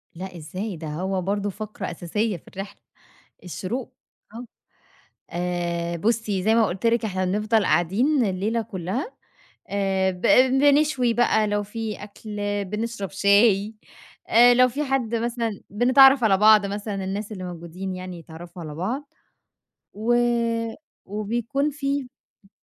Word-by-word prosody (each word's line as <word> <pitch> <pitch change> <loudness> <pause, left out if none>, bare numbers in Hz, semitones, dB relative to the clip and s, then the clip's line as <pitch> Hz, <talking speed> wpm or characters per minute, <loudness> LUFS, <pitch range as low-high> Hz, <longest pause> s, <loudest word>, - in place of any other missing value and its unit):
لأ 180 0 -7
إزاي؟! 185 +5 -5
ده 160 0 -7
هو 185 +5 -2
برضو 205 +2 -1
فقرة 210 -2 -6
أساسية 190 +4 -2
في - - -22
الرحلة، 195 +1 -8 0.6
الشروق 185 - -5 0.4
آه، 240 +2 -7 0.9
آآ، 170 -1 -2
بُصّي 210 -1 0
زي 220 +3 +3
ما 230 -1 +4
قلت 190 +2 -4
لِك 230 0 +2
إحنا 185 -3 -1
بنفضل 210 +3 +1
قاعدين 235 - +2
الليلة 205 +4 -1
كلّها، 205 - -4 0.6
آآ، 195 -1 +1
ب 180 - -11 0.4
بنشوي 280 -4 +3
بقى 225 -2 +2
لو 205 0 0
في 215 0 -5
أكْل، 210 0 -8 0.3
بنشرب 210 0 -4
شاي، 200 +1 +3 0.5
آآ، 240 +2 +7
لو 255 +1 +5
في 275 +5 -3
حد 260 -5 -1
مثلًا 230 -2 -2
بنتعرّف 260 +4 +6
على 195 -3 +4
بعض 215 0 +6
مثلًا 200 0 -4
الناس 200 +3 -4
اللي 190 -3 -6
موجودين 180 +2 -6
يعني 185 -1 -7
يتعرّفوا 170 +2 -11
على 150 -2 -7
بعض، 250 - -4 0.8
و 225 +4 +1 0.9
وبيكون 235 +8 -2
في 280 -1 -2
اهم. 250 -5 -17
205 Hz, 135 wpm, -24 LUFS, 185-230 Hz, 0.9 s, آآ